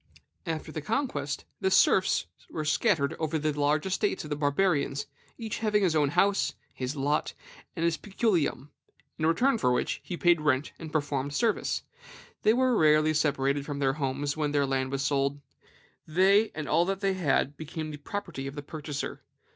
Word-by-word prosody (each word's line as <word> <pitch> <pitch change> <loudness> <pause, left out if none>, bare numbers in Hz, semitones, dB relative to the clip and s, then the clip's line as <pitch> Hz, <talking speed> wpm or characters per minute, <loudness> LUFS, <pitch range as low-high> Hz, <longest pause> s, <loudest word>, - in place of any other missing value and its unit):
"After 160 -1 -3
the 155 - -4
conquest, 150 - -2
the 190 - +1
serfs 190 0 +4 0.2
were 155 - -4
scattered 155 -4 +2
over 160 0 -1
the 155 0 0
large 145 +2 +1
estates 190 +1 0
of 150 - -9
the - - +1
Barbarians, 145 -1 +1 0.3
each 225 -3 -4
having 210 -2 +2
his 175 -4 +3
house, 170 +7 +2 0.2
his 130 +2 -4
lot, 145 +2 0 0.4
and 165 - -1
his 170 -1 +1
peculium, 190 - 0 0.5
in 155 - +2
return 235 +9 +3
for 125 - +2
which 125 - -1
he 175 - -5
paid 175 -2 +4
rent 145 -1 +1
and 160 -2 -7
performed 145 -2 -1
service. 225 +3 0 0.6
They 215 - +5
were 255 0 +3
rarely 155 -2 +4
separated 140 -2 +1
from 145 0 -5
their 135 -1 +1
homes 140 0 -2
when 150 -2 -1
their 145 -1 +3
land 135 -1 -1
was 135 0 -1
sold; 140 0 0 0.7
they 195 +6 +4
and 155 -2 -4
all 170 - +3
that 195 +1 -2
they 195 -1 +2
had 150 -5 +1
became 155 +1 -6
the 150 - -7
property 150 -3 -5
of 135 - -7
the 145 - -6
purchaser. 150 -1 -5
155 Hz, 175 wpm, -28 LUFS, 145-185 Hz, 0.7 s, They